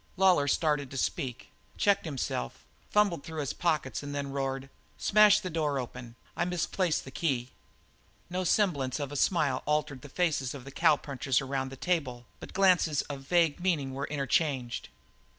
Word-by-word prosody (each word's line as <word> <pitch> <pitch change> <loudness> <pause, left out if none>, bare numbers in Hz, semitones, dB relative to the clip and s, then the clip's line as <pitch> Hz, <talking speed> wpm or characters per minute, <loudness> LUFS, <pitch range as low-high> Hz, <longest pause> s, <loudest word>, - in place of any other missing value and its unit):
Lawlor 180 -6 +4
started 150 -2 +1
to 135 - -7
speak, 125 -1 -3 0.3
checked 200 -2 +3
himself, 130 - -4 0.2
fumbled 200 -8 +2
through 160 -1 -6
his 140 -3 -2
pockets, 155 -6 -1
and 145 0 -6
then 140 -1 -3
roared: 135 -1 -2 0.3
"Smash 210 0 +6
the 185 -3 -5
door 150 -3 0
open. 125 -2 -6 0.2
I - - 0
misplaced 180 -1 0
the 130 - -9
key." 130 -4 -1 0.8
No 180 +1 -2
semblance 155 - +1
of 140 -1 -4
a - - -6
smile 150 -2 +2
altered 150 -3 0
the 145 - -11
faces 145 -5 0
of 135 -2 -9
the 135 - -9
cowpunchers 135 -1 +2
around 135 -1 -2
the 135 - -8
table, 130 -8 -1
but - - -9
glances 180 -6 +3
of 140 -2 -7
vague 165 +2 +2
meaning 160 -7 0
were 140 +1 -3
interchanged. 140 -3 -1
145 Hz, 165 wpm, -29 LUFS, 135-170 Hz, 0.8 s, Smash